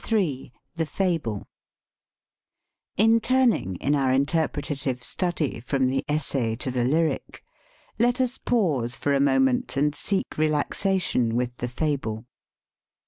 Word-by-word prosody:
Ill 170 -12 0 0.3
THE 160 -1 0
FABLE 160 - -1 1.5
IN 225 +2 +5
turning, 240 - +2
in 140 +11 0
our 135 -3 +2
interpretative 140 -2 -1
study, 170 -4 -2
from 130 +1 0
the 135 - 0
essay 135 -6 -1
to 130 +2 -4
the 125 -1 0
lyric, 155 +6 0 0.6
let 245 +2 +2
us 255 -1 0
pause 145 - +1
for 145 - 0
a 140 - +3
moment 135 -1 +2
and 145 +1 +2
seek 190 0 -2
relaxation 155 - +1
with 125 0 -1
the 120 - -3
fable. 125 -5 -2
145 Hz, 125 wpm, -25 LUFS, 125-175 Hz, 1.5 s, IN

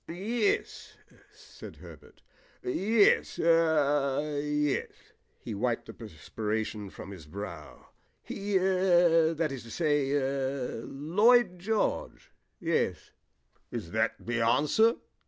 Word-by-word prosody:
"Yes," 205 +6 -2 0.3
said - - -13
Herbert. - - -15 0.4
"Yes 225 - +2
er 150 -3 +2
yes." 150 -1 0 0.5
He - - -7
wiped 120 +3 -1
the - - -10
perspiration 105 +2 -5
from 100 - -10
his 85 -6 -11
brow. 85 -3 -8 0.4
"He 200 0 -2
er 175 -3 +3
that 155 -2 -1
is 135 -3 -6
to 115 - -13
say 145 +1 0
er 135 -3 -2
Lloyd 180 - +3
George, 220 - -2 0.3
yes." 160 - -1 0.6
"Is - - -6
that - - 0
the 115 0 -2
answer?" 150 - +3
150 Hz, 105 wpm, -29 LUFS, 120-180 Hz, 0.6 s, er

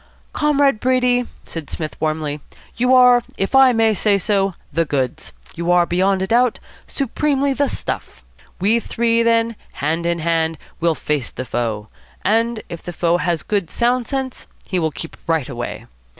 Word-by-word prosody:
"Comrade 285 -5 +2
Brady," 250 -1 +2 0.2
said 160 -3 -7
Psmith 155 -2 -5
warmly, 155 -1 -1 0.4
"you 250 +2 +1
are, 250 -1 +7 0.2
if 195 - -1
I 265 -1 +7
may 225 -2 +3
say 205 0 +2
so, 195 -2 +1 0.2
the 165 +3 +2
goods. 135 -5 -2 0.2
You 170 +1 -3
are, 175 -1 +5
beyond 190 +2 +1
a - - +1
doubt, 240 +3 +2 0.3
supremely 280 +1 0
the 285 +1 +1
stuff. - - -5 0.4
We 210 +5 +3
three, 230 0 +1
then, 230 0 +2 0.2
hand 165 +4 -1
in 170 0 +1
hand, 165 -1 0 0.2
will 170 -1 +2
face 150 -6 -2
the 130 - -6
foe; 110 -4 -2 0.4
and 225 +2 +1
if 170 - -7
the 175 - -7
foe 170 +1 +2
has 175 -2 -1
good, 200 -6 -1
sound 240 0 +1
sense, 265 -2 -4 0.2
he 185 - -1
will 160 -2 +1
keep 150 +3 -8
right 160 -4 +1
away. 120 -4 -5
195 Hz, 165 wpm, -20 LUFS, 165-240 Hz, 0.4 s, are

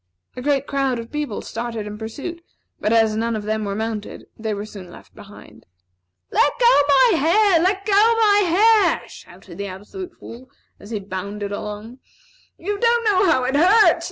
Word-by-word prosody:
A 250 - -6
great 280 0 0
crowd 275 -3 -1
of 230 0 -8
people 295 -8 -4
started 230 -2 -5
in 210 0 -7
pursuit, 290 +10 -7 0.4
but 210 - -1
as 225 -1 +3
none 230 +1 -1
of 215 - -4
them 215 0 -2
were 200 0 -3
mounted, 220 -1 -5
they 220 -1 -4
were 205 0 -4
soon 195 -4 -11
left - - -15
behind. 200 - -15 0.6
"Let 290 - +3
go 480 -9 +5
my 340 - +4
hair! 360 +4 +3
Let 385 +2 0
go 430 - -2
my 430 0 +4 0.6
hair!" - - -15
shouted 175 -1 -14
the 200 - -4
Absolute 270 - -9
Fool, 255 +3 -12 0.3
as 205 - -13
he 220 -2 -3
bounded 200 +1 -6
along. 210 +4 -7 0.6
"You 405 +3 -4
don't 470 +1 +2
know 400 -2 +3
how 260 -4 +2
it 260 +2 -1
hurts. 390 +8 +5
240 Hz, 180 wpm, -21 LUFS, -, 0.6 s, go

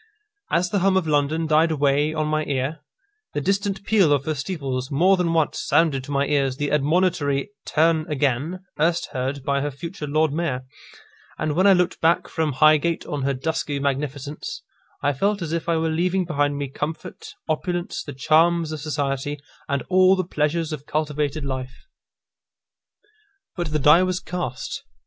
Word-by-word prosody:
As 175 +1 +1
the 200 - +2
hum 190 +1 +3
of 185 - +1
London 155 +2 +1
died 160 +1 +3
away 145 0 +2
on 155 -1 -1
my 155 0 0
ear, 140 +3 -2 0.6
the - - +1
distant 195 +3 -1
peal 200 -8 +3
of 140 -1 +2
her 155 - 0
steeples 135 -4 -3
more 175 +7 +4
than 180 -2 0
once 160 -2 +1
sounded 150 -5 +2
to 145 - -8
my 140 0 +1
ears 135 -3 0
the 145 -1 -2
admonitory 150 0 +1 0.2
"Turn 160 0 +2
again," 145 +5 0 0.2
erst 165 +2 +1
heard 135 +1 -3
by 140 0 0
her 145 - -1
future 155 +3 -7
Lord 155 +1 +1
Mayor; 150 -6 -2 0.7
and 155 -1 -1
when 185 +5 +3
I 195 - +8
looked 180 -1 +1
back 165 +1 +3
from 160 -3 -1
Highgate 155 +4 +3
on 145 -2 -3
her 135 +1 0
dusky 145 +1 -2
magnificence, 140 +1 -3 0.4
I 145 +1 +2
felt 200 +9 0
as 165 -3 -4
if 170 0 -2
I 165 - +2
were 160 0 0
leaving 180 +3 +1
behind 145 -3 0
me 140 -1 -2
comfort, 150 +4 -6
opulence, 175 +2 -2
the 145 - -7
charms 160 +4 +3
of 155 -2 -5
society, 145 -1 -2 0.3
and 140 -1 0
all 185 0 +5
the 185 - 0
pleasures 155 0 -1
of 145 -2 -7
cultivated 150 -1 -1
life. 130 -1 -5 1.7
But 175 -4 -3
the 155 - +1
die 150 +4 +6
was 185 -1 0
cast. 175 -10 -4
155 Hz, 170 wpm, -23 LUFS, 140-170 Hz, 1.7 s, I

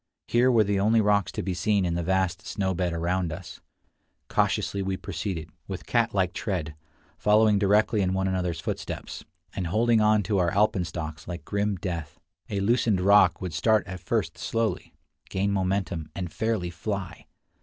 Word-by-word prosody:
Here 125 +2 +4
were 115 -3 +5
the 100 -1 0
only 110 +3 +4
rocks 100 -3 +2
to - - -3
be 95 - -2
seen 100 +3 +1
in 85 - 0
the 85 - -1
vast 95 +2 0
snow 95 -2 -1
bed 90 -1 -1
around 85 +1 -1
us. 85 0 -8 0.7
Cautiously 100 - +1
we 95 0 -2
proceed, 90 -3 -4 0.2
with 95 -2 -6
cat 115 -1 +1
like 95 -4 0
tread, 90 -7 -3 0.5
following 105 -1 +4
directly 105 +2 +3
in 95 0 +1
one 95 0 0
another's 90 -2 -1
footsteps, - - -5 0.3
and 90 -3 -2
holding 115 +4 +3
on 105 -1 +4
to 100 +1 0
our 85 -2 +2
alpenstocks 85 -6 -1
like 90 0 -6
grim 100 0 0
death. 85 -5 -5 0.3
A 100 -1 -1
loosened 110 -2 +2
rock 95 -1 +5
would 90 -3 -4
start 105 +3 +2
at 90 0 -7
first - - -2
slowly, 115 -5 -2 0.3
gain 100 +1 0
momentum, 95 -4 -1
and 90 -4 -5
fairly 110 -6 -1
fly. 95 +1 -5
95 Hz, 170 wpm, -26 LUFS, 90-105 Hz, 0.7 s, were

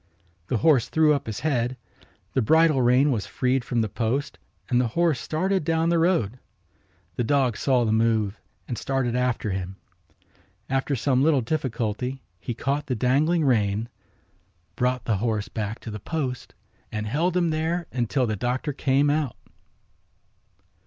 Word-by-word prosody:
The 125 - 0
horse 145 -4 +3
threw 155 -1 +4
up 140 - -2
his 110 +3 -4
head, 130 -4 0 0.6
the 130 - +2
bridle 155 +3 +4
rein 125 +4 +4
was 110 -6 -2
freed 130 0 0
from 120 -1 0
the 110 - 0
post 120 +6 -2 0.3
and 125 -1 +2
the 125 - +1
horse 170 -6 +3
started 185 +4 0
down 165 +1 +1
the 170 -1 +3
road. 160 - +1 0.8
The - - +1
dog 130 -1 +2
saw 130 -1 +2
the 110 - +1
move 110 -2 +1 0.3
and 120 - -4
started 130 -3 -1
after 125 -4 0
him. 95 0 -4 1.0
After 135 +1 0
some 130 +1 +1
little 145 -2 +4
difficulty 125 -1 -2 0.2
he 115 +4 -5
caught 140 +5 -2
the 130 - -1
dangling 145 +8 +2
rein, 110 -3 +1 0.9
brought 125 -1 0
the 110 -4 +1
horse 110 -1 -1
back 110 0 -4
to 115 - -7
the 105 - -6
post 130 - -4 0.4
and 105 0 -3
held 165 +11 0
him 170 -2 +2
there 165 +2 -1
until 125 +1 0
the 110 -2 -1
doctor 125 +6 -2
came 140 +1 +2
out. 150 -5 -1
130 Hz, 160 wpm, -25 LUFS, 115-150 Hz, 1.0 s, threw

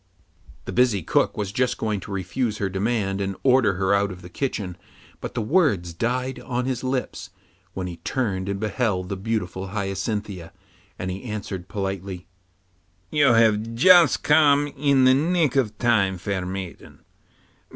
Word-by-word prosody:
The - - -5
busy 120 -7 +2
cook - - +1
was 100 -2 -2
just 125 +4 0
going 110 -2 -1
to 100 - -10
refuse 105 +4 -2
her 100 -2 -1
demand 100 0 -1
and 95 0 -2
order 130 -5 +4
her 95 +1 +1
out 100 0 +2
of 90 0 -10
the 90 - -10
kitchen, 100 -7 -3 0.4
but - - -7
the - - -1
words 105 - +1
died 125 +6 -2
on 125 0 -3
his 130 -2 -2
lips 130 0 -3 0.5
when 95 - -3
he 90 -2 -6
turned 95 0 -2
and 100 0 -2
beheld 105 -4 -1
the 100 - -2
beautiful 95 -2 -3
Hyacinthia, 100 -2 -4 0.4
and 95 0 -4
he 95 +2 -6
answered 100 -5 -5
politely, 95 -2 -4 0.9
'You 145 -5 +4
have 115 0 +3
just 175 +3 +6
come 145 -1 +4
in 140 -1 +3
the 130 0 +6
nick 155 0 +1
of 110 -6 +1
time, 100 -6 +2
fair 95 -1 -3
maiden. 95 -1 -8
105 Hz, 160 wpm, -24 LUFS, 95-125 Hz, 0.9 s, just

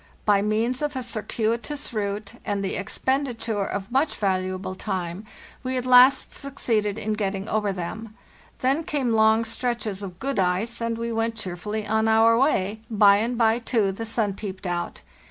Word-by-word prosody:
By 205 -2 +4
means 225 +5 0
of 295 -1 -2
a 260 - -2
circuitous 235 +4 -2
route, 205 -1 -3
and 200 -1 -2
the 190 - -2
expenditure 230 0 -1
of 200 +2 -4
much 275 +4 +1
valuable 185 -1 -1
time, 185 +1 -4 0.3
we 255 0 -2
at 250 - -2
last 255 +2 +6
suc 275 -1 -7
ceeded 210 -5 0
in 215 -1 -2
getting 200 -1 -2
over 210 -2 0
them. 205 +4 -6 0.5
Then 275 +5 +2
came 270 -7 0
long 220 +1 +4
stretches 225 -3 -2
of 185 -3 -7
good 270 +3 -2
ice, 190 +6 0
and 230 0 -1
we 230 0 -3
went 225 0 -1
cheerfully 210 +2 -4
on 220 +1 +1
our 225 +1 +5
way; 220 -5 +1
by 205 -2 +6
and 230 +3 -1
bye, 225 0 +3
too, 225 -4 +1
the 225 +4 -5
sun 220 -2 0
peeped 195 -1 -7
out. 175 -1 -3
220 Hz, 170 wpm, -25 LUFS, 200-235 Hz, 0.5 s, last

